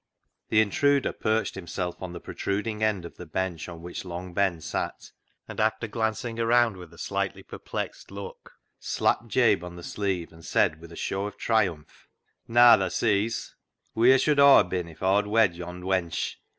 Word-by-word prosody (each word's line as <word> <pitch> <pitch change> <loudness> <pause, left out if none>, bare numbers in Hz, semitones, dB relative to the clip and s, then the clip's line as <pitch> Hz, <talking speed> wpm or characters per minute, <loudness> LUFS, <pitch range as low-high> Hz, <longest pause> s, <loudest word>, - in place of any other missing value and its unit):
The 110 - +5
intruder 140 +6 +2
perched 110 +1 0
himself 90 -1 -5
on 90 -2 -5
the 85 - -7
protrud 100 +2 -3
ing 110 -1 -4
end 105 -5 0
of 85 - -11
the 90 - -8
bench 90 0 -3
on 85 -1 -10
which 90 - -6
Long 90 0 -7
Ben 95 -3 +1
sat, - - -5 0.4
and - - -8
after - - +1
glancing 115 +1 -2
round 115 -1 +3
with 90 -3 -11
a 85 - -16
slightly 100 +1 -3
per - - -10
plexed - - -5
look 100 0 -9 0.3
slapped - - 0
Jabe - - +3
on 90 0 -8
the 85 - -10
sleeve 95 -5 -3
and 80 0 -15
said, 80 0 +1
with 85 0 -12
a - - -10
show 100 +4 -2
of 105 - -10
triumph 95 -10 -1
— - - -46
" - - -51
Naa, 120 +1 +7
tha 95 -1 -1
sees; 110 +3 0 0.4
wheer 125 +4 +6
should 145 +2 +2
Aw 140 -6 +8
ha' - - -11
been 90 -1 -3
if 80 - -12
Aw'd 100 +2 +3
wed 105 -4 +3
yond' 90 +1 -8
wench 90 -3 -1
95 Hz, 195 wpm, -26 LUFS, 90-110 Hz, 0.4 s, Aw